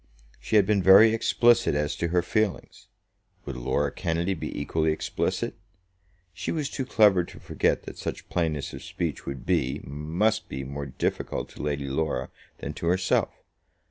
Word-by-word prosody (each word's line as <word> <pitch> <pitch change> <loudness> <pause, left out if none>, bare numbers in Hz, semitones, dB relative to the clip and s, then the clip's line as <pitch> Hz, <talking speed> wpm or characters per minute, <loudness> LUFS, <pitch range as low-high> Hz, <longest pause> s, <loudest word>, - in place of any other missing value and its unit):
She - - -2
had 105 -2 +6
been 100 -1 +2
very 100 +4 +8
explicit 115 -3 +3
as 75 0 0
to 85 - 0
her 85 +1 +1
feelings. 105 +1 -2 0.6
Would 70 - -5
Laura - - 0
Kennedy 85 +3 -1
be 85 - -5
equally 80 +2 0
explicit? 80 - -2 0.8
She 85 - -4
was 150 -4 -2
too 130 -2 -3
clever 105 -7 +5
to - - -13
forget - - 0
that - - -9
such - - -5
plainness 80 -5 -1
of - - -7
speech 80 -6 -4
would 70 -2 -5
be, 65 +1 +1
must 80 - -1
be 65 +1 -4
more 70 +1 -5
difficult 65 - -3
to - - -10
Lady 75 -1 -2
Laura 80 +4 -2 0.3
than - - -5
to 85 - -4
herself. 95 +2 +2
85 Hz, 165 wpm, -26 LUFS, 75-105 Hz, 0.8 s, very